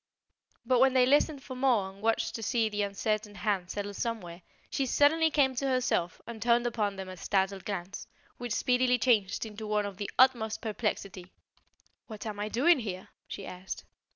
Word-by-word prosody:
But 250 0 +3
when 265 0 +4
they 255 -1 +6
listened 285 +1 +2
for 260 - -7
more 250 -7 +2
and 195 +1 -17
watched 225 +1 0
to 225 - -5
see 225 0 +1
the 210 0 -2
uncertain 205 +1 -2
hand 190 -2 -1
settle 205 +1 -4
somewhere, 195 -6 -4 0.3
she 270 - 0
suddenly 320 +5 +4
came 280 -4 +3
to 270 +2 -2
herself 255 -9 0
and 225 -1 -8
turned 235 +1 +3
upon 215 -4 -1
them 190 -1 -6
a 185 - -7
startled 190 +1 -1
glance, 190 -2 -5 0.3
which 240 -2 -3
speedily 250 0 +2
changed 225 -5 +2
into 215 0 -7
one 210 -1 +1
of 200 -2 -6
the 205 - -4
utmost 240 -4 +4
perplexity. 200 -4 -3 0.8
"What 215 -2 -8
am 210 -2 -5
I 210 +1 -2
doing 285 +8 +4
here?" 190 -5 -6 0.2
she 195 - -7
asked. 185 +1 -7
220 Hz, 180 wpm, -30 LUFS, 200-250 Hz, 0.8 s, they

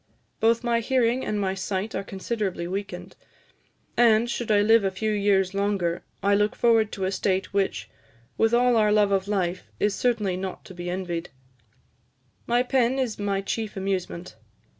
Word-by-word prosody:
Both 230 +2 +3
my 235 -1 +2
hearing 250 +1 +1
and 210 - -2
my 190 -1 0
sight 190 +2 -3
are - - -2
considerably 195 -2 -3
weakened, 195 +2 -5 0.8
and, 230 -1 +4
should 240 -1 -3
I 205 -1 +4
live 225 +1 +5
a 195 - +2
few 215 +3 -2
years 200 -2 +2
longer, 195 -4 0 0.2
I 200 +1 +3
look 210 +1 +2
forward 225 -3 +3
to 190 - -2
a 190 - -1
state 190 -1 -1
which, 190 - -1 0.5
with 225 - +2
all 245 0 +4
our 210 -1 +3
love 210 -1 +3
for 200 - -11
life, 185 -3 -1 0.2
is 205 -1 +2
certainly 210 -4 0
not 185 0 -6
to - - -11
be 175 0 -6
envied.... 175 -2 -3 1.2
My 240 +1 +3
pen 255 0 +1
is 250 -6 -2
my 200 -1 -1
chief 215 +1 -4
amusement. 185 - -3
205 Hz, 170 wpm, -25 LUFS, 190-225 Hz, 1.2 s, live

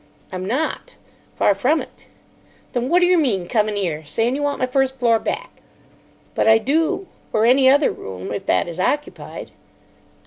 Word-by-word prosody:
"I'm 185 0 -5
not. 270 +9 -2 0.4
Far 205 - +3
from 260 +11 +1
it." - - -11 0.7
"Then 245 +1 -1
what 355 +3 +4
d'yer 355 -1 +4
mean 200 - 0
coming 215 -1 0
'ere 165 -6 -2
saying 225 - -1
you 290 - -3
want 290 0 -1
my 255 - 0
first 265 +1 0
floor 230 -2 +3
back?" 485 - -5 0.7
"But - - +1
I 220 0 +7
do. 320 - 0 0.2
Or 220 +1 +2
any 260 +2 +5
other 285 +2 +4
room, 95 -1 -8
if 195 - -6
that - - +2
is 170 +1 -7
occupied." 295 +10 -3
245 Hz, 170 wpm, -21 LUFS, 200-290 Hz, 0.7 s, I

